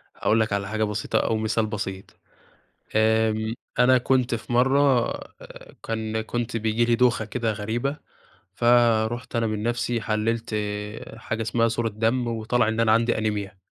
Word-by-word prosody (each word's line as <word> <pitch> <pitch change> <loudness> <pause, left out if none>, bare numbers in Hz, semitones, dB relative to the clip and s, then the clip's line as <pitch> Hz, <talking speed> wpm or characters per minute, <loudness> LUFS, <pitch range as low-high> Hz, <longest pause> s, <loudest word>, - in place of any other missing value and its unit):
هاقول 110 - +1
لك 110 -2 0
على 100 0 -1
حاجة 110 +2 -1
بسيطة 105 0 -1
أو 110 - 0
مثال 110 0 0
بسيط، 95 -3 -6 0.8
آمم، 110 0 +2 0.3
أنا 130 +1 +6
كنت 125 -1 +1
في 115 +1 -6
مرَّة 130 +3 +4 0.6
آآ - - -13
كان 110 -1 -2
كنت 120 +1 -3
بييجي 110 +1 +1
لي 120 0 +3
دوخة 120 -2 +2
كده 115 +1 -2
غريبة، 115 +7 -2 0.6
فرُحت 120 +1 +2
أنا 115 -1 +1
من 110 -1 -2
نفْسي 120 0 -1
حلِّلت 110 +1 -1 0.6
حاجة 115 0 -4
إسمها 115 +1 +1
صورة 115 0 -1
دم 115 +3 0
وطلَع 115 +1 0
إن 110 +1 -1
أنا 115 -1 +4
عندي 115 +1 +2
أنيميا، 105 -2 -3
115 Hz, 155 wpm, -24 LUFS, 110-120 Hz, 0.8 s, أنا